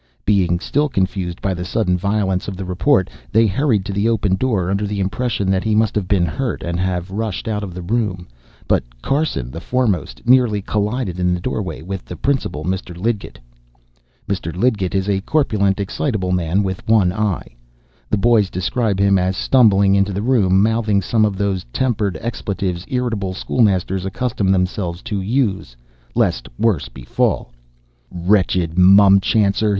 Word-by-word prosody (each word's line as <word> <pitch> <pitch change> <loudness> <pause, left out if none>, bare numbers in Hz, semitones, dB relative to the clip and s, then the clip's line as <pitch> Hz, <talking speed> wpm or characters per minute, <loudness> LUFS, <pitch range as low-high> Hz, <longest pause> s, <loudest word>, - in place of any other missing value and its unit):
Being 90 -4 +2
still 145 +9 0
confused 95 -4 -2
by 95 - 0
the 90 0 -4
sudden 95 0 0
violence 95 0 -1
of 95 -2 -5
the 95 - -5
report, 90 +1 +2 0.2
they 115 +1 +4
hurried 110 -1 +1
to 100 - -4
the 100 +3 +1
open 105 -4 +1
door, 95 -6 0
under 100 +1 -1
the 100 0 -3
impression 100 0 -1
that 95 0 +1
he 110 -1 +1
must 110 -1 +2
have 100 -4 -2
been 95 -3 +2
hurt, 115 - -3
and 85 0 -2
have 90 0 -2
rushed 110 0 -3
out 105 -2 -1
of 90 -3 -7
the 90 - -6
room. 95 -3 -2 0.4
But - - -1
Carson, 135 - -1
the 80 - -7
foremost, 115 -6 -1
nearly 125 -4 +4
collided 105 -1 -2
in 90 0 +1
the - - -4
doorway 90 -6 -4
with 95 +1 -5
the 90 - -8
principal, 120 - -2
Mr. 90 -1 -3
Lidgett. 105 +2 -3 0.9
Mr. 90 -4 -3
Lidgett 100 -4 0
is 95 0 0
a 100 -1 0
corpulent, 105 -8 +1
excitable 100 -1 -2
man 90 +2 +1
with 95 -1 -3
one 105 -5 +3
eye. 100 - -2 0.5
The - - +1
boys 110 -2 +3
describe 100 +2 -1
him 100 -1 +4
as 90 +1 -1
stumbling 100 -6 +4
into 100 0 +2
the 100 +2 -3
room 100 -6 +3
mouthing 110 -3 +1
some 110 +2 +2
of 100 -2 -2
those 100 -2 -1
tempered 105 - -1
expletives 95 -6 -3
irritable 115 -7 -2
schoolmasters 95 -4 +1
accustom 100 0 -2
themselves 90 -1 -1
to 105 -5 -3
use 100 - -1 0.4
lest - - 0
worse 110 -10 +1
befall. 65 -2 -1 0.6
"Wretched 90 -2 +1
mumchancer!" 100 +2 +5
100 Hz, 165 wpm, -19 LUFS, 90-110 Hz, 0.9 s, mumchancer